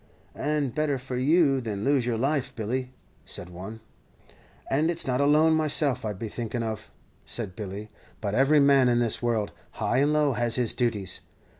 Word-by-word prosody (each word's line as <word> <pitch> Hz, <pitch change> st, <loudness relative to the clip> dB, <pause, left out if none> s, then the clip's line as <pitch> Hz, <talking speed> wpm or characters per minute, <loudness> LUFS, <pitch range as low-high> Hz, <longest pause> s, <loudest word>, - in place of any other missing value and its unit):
"And 145 Hz, -4 st, -1 dB
better 150 Hz, -2 st, 0 dB
for 130 Hz, 0 st, -6 dB
you 140 Hz, +1 st, +3 dB
than 105 Hz, -4 st, -4 dB
lose 135 Hz, -3 st, +2 dB
your 120 Hz, -2 st, 0 dB
life, 140 Hz, +1 st, -1 dB
Billy," 125 Hz, +3 st, -3 dB, 0.3 s
said 90 Hz, -, -6 dB
one. 95 Hz, +6 st, -8 dB, 0.9 s
"And 150 Hz, +5 st, +1 dB
it's 170 Hz, -1 st, 0 dB
not 125 Hz, +1 st, 0 dB
alone 155 Hz, +3 st, +5 dB
myself 150 Hz, -4 st, +1 dB
I'd 105 Hz, -3 st, -3 dB
be 115 Hz, -, -4 dB
thinking 115 Hz, +2 st, -4 dB
of," 110 Hz, -1 st, -5 dB, 0.3 s
said 105 Hz, -6 st, -4 dB
Billy; 105 Hz, 0 st, -6 dB, 0.3 s
"but 100 Hz, -2 st, -3 dB
every 135 Hz, +6 st, +4 dB
man 140 Hz, -3 st, +5 dB
in 120 Hz, -, +3 dB
this 120 Hz, -2 st, +1 dB
world, 115 Hz, -4 st, 0 dB, 0.2 s
high 125 Hz, -, 0 dB
and 145 Hz, +2 st, +3 dB
low, 150 Hz, -2 st, +2 dB
has 120 Hz, -1 st, 0 dB
his 125 Hz, -3 st, +1 dB
duties. 115 Hz, -6 st, -1 dB
125 Hz, 175 wpm, -27 LUFS, 110-140 Hz, 0.9 s, alone